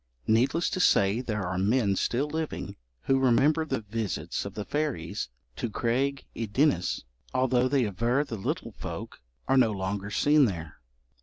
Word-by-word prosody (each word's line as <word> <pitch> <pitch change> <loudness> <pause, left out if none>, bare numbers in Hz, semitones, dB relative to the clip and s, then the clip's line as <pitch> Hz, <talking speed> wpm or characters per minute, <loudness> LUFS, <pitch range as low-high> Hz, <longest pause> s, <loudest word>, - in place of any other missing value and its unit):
Needless 130 +10 +2
to - - -2
say 100 - +4
there 110 -6 -2
are 90 +1 -2
men 105 0 +2
still 125 +8 0
living 160 +1 -4 0.3
who 135 0 +2
remember 135 +5 +3
the 135 -6 -2
visits 110 -1 -3
of - - -7
the 105 - -4
fairies 145 - -2 0.3
to 120 - -2
Craig 130 +5 0
y 115 - -3
Ddinas, 115 - +2 0.3
although 130 -1 +3
they 130 -2 +2
aver 115 +7 +1
the 140 - -8
little 95 - -3
folk - - -7 0.3
are 135 - +3
no 125 -3 +5
longer 100 0 -3
seen 145 +6 +4
there. 85 - -4
120 Hz, 160 wpm, -28 LUFS, 100-135 Hz, 0.3 s, no